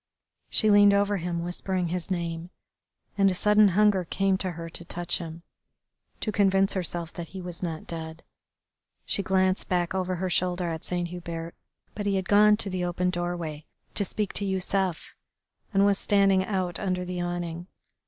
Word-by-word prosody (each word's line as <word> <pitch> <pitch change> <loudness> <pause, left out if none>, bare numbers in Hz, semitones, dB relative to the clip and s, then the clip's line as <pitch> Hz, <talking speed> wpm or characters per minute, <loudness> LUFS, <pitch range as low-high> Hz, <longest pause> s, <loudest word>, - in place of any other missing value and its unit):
She 215 -2 +3
leaned 205 0 +7
over 200 0 +2
him 170 -1 -3
whispering 180 0 -2
his 180 +1 -3
name, 170 -2 -3 0.7
and 195 0 +6
a 185 - -1
sudden 210 +2 +5
hunger 200 0 +3
came 195 +3 +1
to 185 -3 -1
her 165 0 -7
to 165 +1 -6
touch 175 +1 -2
him, 165 -1 -8 0.8
to 215 - -1
convince 195 -1 +3
herself 175 -2 -3
that 170 -1 -6
he 190 - -8
was 180 -2 -6
not 165 -3 -4
dead. 160 0 -7 0.8
She - - +1
glanced 190 0 +1
back 175 -1 0
over 185 -1 -1
her 185 +2 -2
shoulder 180 -1 0
at 160 0 -5
Saint 175 -1 -1
Hubert, 170 -1 -6 0.4
but 205 -1 -4
he 200 - +2
had 190 -1 -1
gone 210 +1 +6
to 205 - -1
the 185 -1 -2
open 180 +1 0
doorway 175 -4 -4 0.3
to 205 - +1
speak 205 +1 -3
to 200 - -1
Yusef, 190 -2 -1 0.6
and 200 -1 +4
was 200 -1 +3
standing 195 -2 +3
out 185 -4 -2
under 185 -2 -1
the 180 0 -3
awning. 175 -1 -4
180 Hz, 175 wpm, -27 LUFS, 175-195 Hz, 0.8 s, leaned